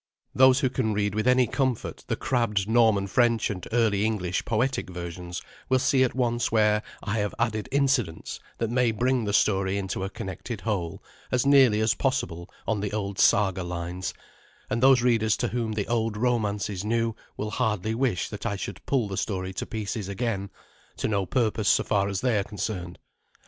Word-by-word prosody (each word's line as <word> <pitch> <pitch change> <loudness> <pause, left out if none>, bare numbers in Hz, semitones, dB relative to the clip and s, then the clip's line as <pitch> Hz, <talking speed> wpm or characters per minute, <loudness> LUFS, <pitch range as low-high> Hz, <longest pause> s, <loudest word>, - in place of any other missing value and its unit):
Those 130 +1 +6
who 130 - +2
can 115 -5 0
read 105 -1 0
with 110 +3 -1
any 125 0 +5
comfort 130 +1 -2
the - - 0
crabbed 105 -6 0
Norman 110 -3 +4
French 115 +2 +2
and 90 -3 -6
Early 110 -4 +2
English 100 -5 -1
poetic 125 -1 0
versions 85 -1 -6 0.3
will 130 - +4
see 135 +1 +2
at 125 - 0
once 120 -2 0
where 105 -1 +3 0.2
I 105 +2 -1
have 105 0 -2
added 110 0 -1
incidents 130 - 0 0.2
that 115 -1 -2
may 125 -1 +3
bring 120 +2 +1
the 105 - -1
story 95 -2 +2
into 95 -1 -3
a 95 - -2
connected 100 +3 -6
whole, 95 -7 -3 0.3
as 125 +1 +2
nearly 135 -6 +5
as 110 0 +3
possible 110 -11 -2 0.2
on 110 0 0
the 100 0 -2
old 100 -2 -3
Saga 95 -2 +4
lines; 90 +1 -4 0.6
and 115 - 0
those 130 -2 +6
readers 110 -3 +3
to - - -1
whom 115 0 -2
the 105 -2 -2
old 115 -2 0
romance 105 -4 0
is 95 -2 -4
new 115 +1 0 0.2
will 105 0 -3
hardly 110 -2 0
wish 115 -6 0
that 105 - -7
I 105 -3 -1
should 100 - -6
pull 130 -6 +1
the 95 -1 -5
story 95 -2 -2
to - - -4
pieces 105 -3 -4
again, 100 -2 -2 0.5
to - - -1
no 100 -3 0
purpose 110 -4 +1
so - - +4
far 100 -1 +1
as 95 -1 -2
they 120 -4 +2
are - - 0
concerned. 95 -4 -5
110 Hz, 190 wpm, -26 LUFS, 100-120 Hz, 0.6 s, Those